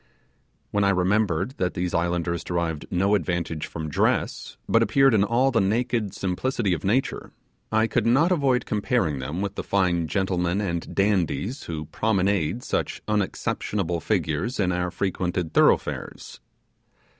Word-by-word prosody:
When 100 0 +1
I 100 - +4
remembered 95 +1 +1
that 90 -1 -1
these 90 0 -2
islanders 85 0 0
derived 85 -3 -2
no 95 +3 +1
advantage 85 -4 -1
from 80 -1 -5
dress, 75 - -1
but - - +4
appeared 135 -2 +4
in 100 -3 +4
all 120 +6 +2
the 115 - +2
naked 110 0 0
simplicity 100 +2 -1
of 80 - -3
nature, 120 +8 -1 0.4
I 110 0 +3
could 115 0 0
not 145 +9 +4
avoid 135 -7 +2
comparing 105 - 0
them 75 +8 -4
with 100 -1 -2
the - - -5
fine 90 -4 +1
gentlemen 90 -1 0
and 85 -5 -3
dandies 100 - 0
who 80 -2 -5
promenade 100 +1 0
such - - -2
unexceptionable 100 -3 -1
figures 90 - -1
in 90 -3 +2
our 90 0 -1
frequented 90 -3 -2
thoroughfares. - - +1
95 Hz, 145 wpm, -25 LUFS, 85-110 Hz, 0.4 s, I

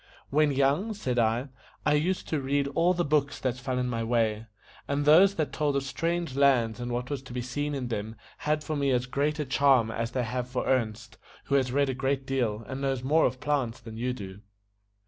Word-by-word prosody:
"When 150 +1 +3
young," 140 +11 +1
said 125 -10 -1
I, 115 +4 +1 0.4
"I 150 - +4
used 170 +6 0
to 155 -3 0
read 140 +1 0
all 170 +5 +2
the 175 0 0
books 145 -1 +1
that 130 -2 -1
fell 125 +1 -3
in 125 0 0
my 115 -2 -2
way; 115 -1 0 0.4
and 145 +1 -1
those 185 +7 +6
that 155 -2 -2
told 150 -2 0
of 140 - 0
strange 165 +1 -2
lands 125 -5 +3
and 120 0 -4
what 125 +2 -3
was 140 -3 -2
to 130 -2 -11
be 125 -1 -3
seen 145 +4 -3
in 125 -3 -3
them 110 0 -4 0.2
had 150 0 0
for 155 - -3
me 140 -1 +1
as 125 -1 +1
great 145 +4 -1
a 150 - -2
charm 130 -4 +3
as 115 0 -2
they 125 +1 -1
have 125 +2 -3
for 125 - -2
Ernest, 115 -2 -1 0.2
who - - -4
has 130 -2 +2
read 140 +2 +2
a - - 0
great 135 +1 -1
deal, 120 -5 -1
and 130 +1 -5
knows 135 -2 -1
more 155 +4 +4
of 130 +1 -5
plants 135 -6 -1
than 115 -2 -10
you 125 +3 -1
do." 100 -6 -7
135 Hz, 225 wpm, -28 LUFS, 120-145 Hz, 0.4 s, those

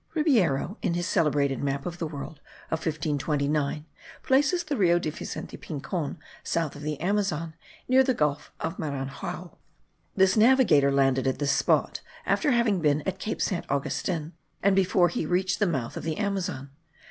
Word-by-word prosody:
Ribeyro, 215 - +2
in 170 - 0
his 175 0 -1
celebrated 140 -5 +1
map 140 0 -2
of 175 -1 -5
the 165 - -2
world 150 0 -7 0.3
of 160 - 0
1529, 150 -1 -1 0.4
places 290 +7 +3
the 305 -3 -2
Rio 175 -6 +4
de 160 -3 -2
Vicente - - -6
Pincon 155 0 -4 0.3
south 165 -4 -1
of 145 - -9
the 150 -1 -3
Amazon, 175 -4 -1 0.3
near 260 +1 +5
the 260 -1 +1
Gulf 150 -3 -1
of 160 - -3
Maranhao. 155 +5 -5 0.6
This 190 0 +4
navigator 215 - +5
landed 135 -1 +2
at 130 - 0
this 145 -1 +1
spot, - - +1 0.2
after 305 - +2
having 235 -7 +2
been 150 -1 +2
at 190 0 -3
Cape 215 - -2
Saint 185 - -2
Augustin, 155 +3 -2 0.3
and 195 0 +4
before 185 -2 +3
he 160 - -2
reached 180 +2 +1
the 205 - +3
mouth 130 -9 -2
of - - -4
the 160 +2 -3
Amazon. 190 -9 -2
165 Hz, 165 wpm, -27 LUFS, 145-195 Hz, 0.6 s, near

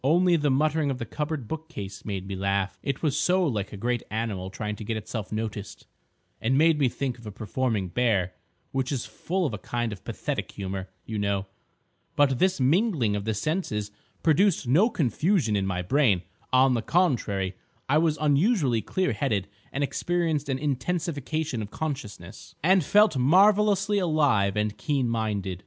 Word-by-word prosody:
"Only 175 +5 +4
the 150 -3 +1
muttering 150 +2 +2
of 135 - -2
the 120 - -4
cupboard 150 -1 -4
bookcase 155 -11 -7
made 95 -3 -4
me 95 0 -5
laugh. 100 0 -1
It 140 +2 -3
was 145 -4 +1
so 180 +4 +2
like 105 -9 -2
a 105 - -7
great 120 +3 -1
animal 105 -4 -3
trying 105 +2 -4
to 110 - -7
get 110 +1 -2
itself 110 0 -5
noticed, 110 -2 -5 0.6
and 130 +4 +2
made 160 0 +4
me 135 -3 +3
think 130 -1 -3
of 115 - -11
a - - -5
performing 110 -1 -2
bear—which 115 +5 -2
is 130 -4 -2
full 185 +1 -2
of 135 - -2
a 105 - -4
kind 120 -1 -2
of 95 - -11
pathetic - - -4
humour, 95 -1 -5 0.2
you 110 -1 -4
know. 100 -1 0 0.7
But 135 -3 +3
this 185 -2 +2
mingling 140 - +2
of 100 0 -3
the 110 -1 -1
senses 105 - -2 0.3
produced 165 -2 +3
no 175 - +4
confusion 150 - +1
in 100 -1 0
my 90 -1 -2
brain. 105 - +2 0.3
On 130 0 +5
the 120 - 0
contrary, 110 - +1 0.3
I 145 +3 +4
was 160 -2 +2
unusually 145 - +2
clear 185 - -1
headed 105 - -1 0.2
and 145 - -1
experienced 160 -1 -1
an 130 - 0
intensification 150 -1 -2
of 105 - -6
consciousness, 110 - -6
and 185 +1 +5
felt 205 0 +4
marvellously 200 +7 +4
alive 145 - +2
and 105 0 0
keen 140 -5 0
minded. 105 -5 -2
130 Hz, 170 wpm, -26 LUFS, 105-160 Hz, 0.7 s, On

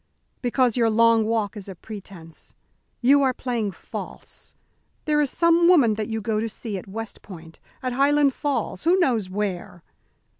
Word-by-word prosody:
"Because 245 -2 +1
your 230 -2 +3
long 230 0 +4
walk 220 -2 -1
is 200 -2 -7
a 190 - -7
pretence. 180 -4 -11 0.5
You 275 +3 +5
are 260 -2 +2
playing 235 -5 -2
false. 190 - -8 0.5
There 300 -1 +2
is 290 - +1
some 335 +2 +3
woman 285 -12 +5
that 210 0 -3
you 220 -1 -3
go 215 0 -1
to 225 +1 -2
see 220 -1 -6
at - - -13
West 225 +3 -7
Point, 165 -4 -12 0.2
at 255 -1 -1
Highland 280 +1 +3
Falls, 285 +1 -2
who 345 +4 +4
knows 235 - +1
where?" 185 -3 -4
230 Hz, 165 wpm, -24 LUFS, 205-270 Hz, 0.5 s, You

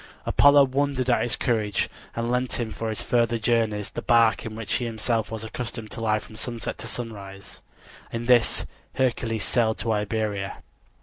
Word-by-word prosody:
Apollo 145 0 +6
wondered 135 -1 +1
at 120 - +3
his 120 - +1
courage 110 -5 0 0.3
and 115 +1 -1
lent 125 0 0
him 115 -2 -2
for 115 0 -3
his 110 - -3
further 120 -1 +2
journeys 110 -3 0
the - - -4
bark 115 -1 +3
in 110 - -7
which 110 -1 -3
he 120 - -3
himself 115 -1 -1
was 110 -1 -5
accustomed 110 -1 -6
to - - -5
lie 110 -1 +2
from 110 - -10
sunset 115 0 -5
to 110 - -6
sunrise. 100 -5 -7 0.5
In 115 0 -3
this 120 -2 +4 0.3
Hercules 115 -4 0
sailed 110 +1 +1
to 115 - -1
Iberia. 105 -2 -2
115 Hz, 175 wpm, -25 LUFS, 110-120 Hz, 0.5 s, Apollo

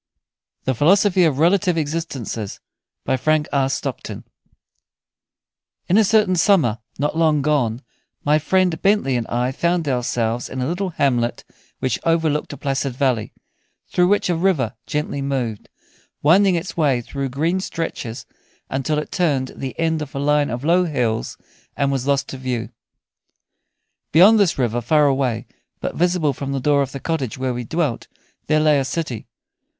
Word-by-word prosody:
"THE 130 - 0
PHILOSOPHY 180 - +4
OF 150 -5 +1
RELATIVE 175 +2 +3
EXISTENCES" 145 -9 -4 0.5
In 130 - +2 2.8
a 220 - +6
certain 210 -2 +3
summer, 165 - +3 0.2
not 150 +2 -1
long 155 -3 +2
gone, 130 -5 0 0.4
my 150 +1 +3
friend 180 0 +1
Bentley 195 -10 +2
and 120 -2 -2
I 125 +2 0
found 170 +3 0
ourselves 120 -2 -1
in 130 - -5
a 125 - 0
little 180 +6 -2
hamlet 125 -7 0 0.3
which 130 - -1
overlooked 160 -3 +1
a 145 - -7
placid 135 -1 -2
valley, 125 -5 0 0.6
through 180 0 +3
which 205 +2 +2
a 175 - +1
river 160 - +1
gently 150 -1 -2
moved, 130 -6 -3 0.5
winding 185 +5 +5
its 170 +2 -4
way 140 -7 +2
through 135 +3 -4
green 160 +8 0
stretches 160 -10 -5 0.5
until 135 +3 -1
it 150 - -4
turned 145 -8 0
the 135 +2 -6
end 160 -1 +1
of 145 -2 -7
a - - -2
line 145 0 +2
of 120 +2 -4
low 175 +4 +3
hills 125 -8 -1 0.4
and 140 -1 +1
was 135 -1 -2
lost 140 -1 +1
to 135 - -6
view. 125 -3 -3 1.4
Beyond 200 +8 +7
this 195 -5 +2
river, 120 -2 0
far 150 +5 +3
away, 130 -5 0 0.3
but - - -3
visible 175 -4 +1
from 140 +1 -4
the 135 - -1
door 145 +2 +2
of 135 -1 -2
the 135 - -6
cottage 140 -6 -3
where 130 -1 -1
we 120 0 -4
dwelt, 150 -2 -2 0.4
there 155 0 +3
lay 155 -2 +4
a - - 0
city. 135 -5 -4
145 Hz, 155 wpm, -21 LUFS, 130-165 Hz, 2.8 s, Beyond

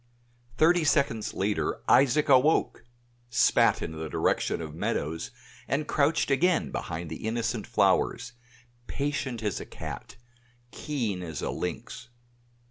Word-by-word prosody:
Thirty 170 +4 +4
seconds 140 -8 +1
later 100 +2 -1
Isaac 140 +3 +4
awoke! 140 +1 +3 0.5
spat 115 - +3
in - - -4
the 80 0 -6
direction - - 0
of 80 -2 -6
Meadows, 80 0 -2 0.4
and 150 +2 -1
crouched 145 0 +1
again 175 +6 +2
behind 80 0 -5
the 80 - -7
innocent 115 0 -2
flowers, 105 +4 +1 0.5
patient 140 -5 -3
as 105 -3 -1
a - - -7
cat, - - -8 0.6
keen 115 -11 -3
as 80 -4 -6
a - - -1
lynx. 115 +5 -5
120 Hz, 125 wpm, -27 LUFS, 95-145 Hz, 0.6 s, Thirty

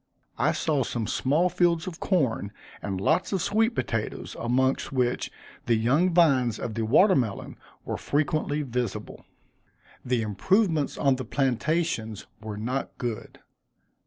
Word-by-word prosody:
I - - +3
saw 150 -4 0
some 115 -2 -2
small 145 - +2
fields 175 -2 +2
of 180 -2 -7
corn, 130 - 0 0.3
and 95 -2 -3
lots 160 - +1
of 195 - +1
sweet 220 +6 +1
potatoes, 110 -2 -3
amongst 130 +3 +1
which 125 -2 0 0.4
the 120 - +4
young 135 +11 +2
vines 135 - +3
of 115 - -4
the 115 - -2
water 185 - +5
melon 115 -7 -2 0.3
were - - -3
frequently 150 0 0
visible. 125 -5 -4 0.8
The 125 -2 0
improvements 160 - +1
on 135 -2 +2
the 130 - -5
plantations 130 - -1 0.2
were 110 -1 -6
not 125 +6 -3
good. 120 -4 -5
130 Hz, 135 wpm, -26 LUFS, 115-165 Hz, 0.8 s, water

